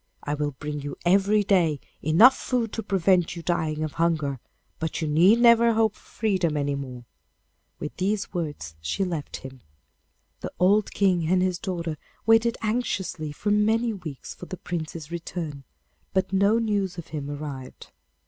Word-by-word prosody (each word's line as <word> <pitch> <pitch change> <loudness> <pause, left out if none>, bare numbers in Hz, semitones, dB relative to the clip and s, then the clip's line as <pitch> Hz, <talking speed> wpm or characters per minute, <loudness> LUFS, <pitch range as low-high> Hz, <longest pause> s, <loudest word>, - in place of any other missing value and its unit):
I 145 - -2
will 145 -1 -2
bring 145 +2 -5
you 145 0 -5
every 200 +3 +4
day 170 -7 +2 0.2
enough 200 - +7
food 240 -4 -2
to 225 - -2
prevent 185 -4 +2
you 170 - -7
dying 160 -3 -1
of 155 - -2
hunger, 155 -5 0 0.4
but 160 -1 -2
you 160 - -1
need 175 +9 +5
never 235 -1 +6
hope 220 -1 +2
for - - -22
freedom 185 -8 -1
any 145 0 0
more.' 130 -3 -6 0.7
With 150 - -6
these 200 +2 -1
words 150 - -4
she 80 - -1
left 165 -5 -4
him. 130 -1 -10 0.8
The - - -6
old 200 +3 +3
King 180 -5 +2
and 180 +2 +3
his 180 -1 0
daughter 170 -5 -4 0.3
waited 225 +1 +4
anxiously 190 -8 -2
for 205 +8 -2
many 220 +3 +2
weeks 160 -9 -8
for 180 - -11
the 185 - -6
Prince's 165 -2 -5
return, 165 -4 -5 0.5
but 190 0 +1
no 200 +3 +4
news 205 -5 -1
of 170 - -8
him 145 -2 -5
arrived. 145 -3 -7
175 Hz, 165 wpm, -25 LUFS, 150-205 Hz, 0.8 s, enough